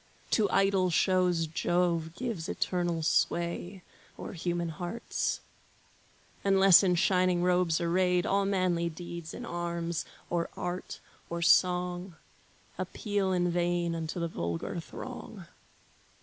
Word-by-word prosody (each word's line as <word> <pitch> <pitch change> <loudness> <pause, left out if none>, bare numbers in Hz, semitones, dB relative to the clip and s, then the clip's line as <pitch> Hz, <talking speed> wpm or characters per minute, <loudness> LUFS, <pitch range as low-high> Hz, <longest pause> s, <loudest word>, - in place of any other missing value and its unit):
To 215 -3 +3
idle 195 -2 +3
shows 180 -1 +2
Jove 170 0 0
gives 215 -8 -4
eternal 175 -3 -1
sway 175 +3 0 0.3
O'er - - -7
human 175 -1 -2
hearts. 175 +8 -3 1.0
Unless 195 -2 +7
in 180 -3 +2
shining 180 0 +2
robes 180 -2 +2
arrayed, 180 +1 +2
All 200 -2 +2
manly 185 -3 +1
deeds 170 0 -7
in - - -7
arms, 170 -1 -3 0.2
or 170 -1 -1
art, 180 +1 -4 0.3
or 170 0 -2
song, 180 +1 +2 0.6
Appeal 205 -4 -1
in 175 -1 +1
vain 175 0 0
unto 165 +1 -4
the 170 - 0
vulgar 85 - -3
throng. - - -8
175 Hz, 115 wpm, -30 LUFS, 170-185 Hz, 1.0 s, Unless